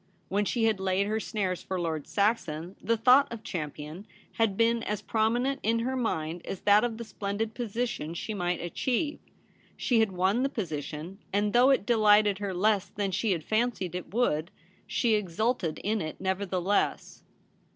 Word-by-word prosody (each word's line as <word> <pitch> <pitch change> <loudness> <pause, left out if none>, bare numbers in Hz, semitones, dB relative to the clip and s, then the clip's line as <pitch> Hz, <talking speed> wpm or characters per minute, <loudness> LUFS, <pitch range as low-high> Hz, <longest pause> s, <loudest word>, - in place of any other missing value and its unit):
When 205 +2 +1
she 235 +3 0
had 220 -3 +2
laid 190 +1 +1
her 215 +2 -1
snares 190 -5 -2
for 190 -1 -3
Lord 160 -4 -2
Saxon 190 -5 0
the 230 +2 +1
thought 255 +5 +5
of 230 -2 -7
Champion 155 +3 -6 0.2
had 220 -4 0
been 230 0 +3
as 210 -2 -2
prominent 240 +6 +1
in 225 +1 +2
her 260 +3 -1
mind 170 -9 -2
as 190 - -6
that 205 +1 +5
of 235 -2 -1
the 235 - -5
splendid 215 0 -3
position 230 -8 -3
she 215 - -4
might 180 -3 -1
achieve. 260 - -1 0.6
She 240 -3 +2
had 220 -3 +3
won 190 +6 +1
the 270 - +1
position; 165 - -5
and 205 +1 +1
though 245 +2 +6
it 270 -7 +3
delighted 210 -3 +4
her 200 -1 -2
less 200 +2 +1
than 200 -1 -2
she 205 +3 0
had 165 -3 -4
fancied 215 -4 0
it 180 0 -6
would, 180 -8 +1 0.4
she 235 -3 +1
exulted 210 -2 0
in 215 +1 0
it 155 -1 -5
nevertheless. 190 0 -1
205 Hz, 170 wpm, -28 LUFS, 180-230 Hz, 0.6 s, though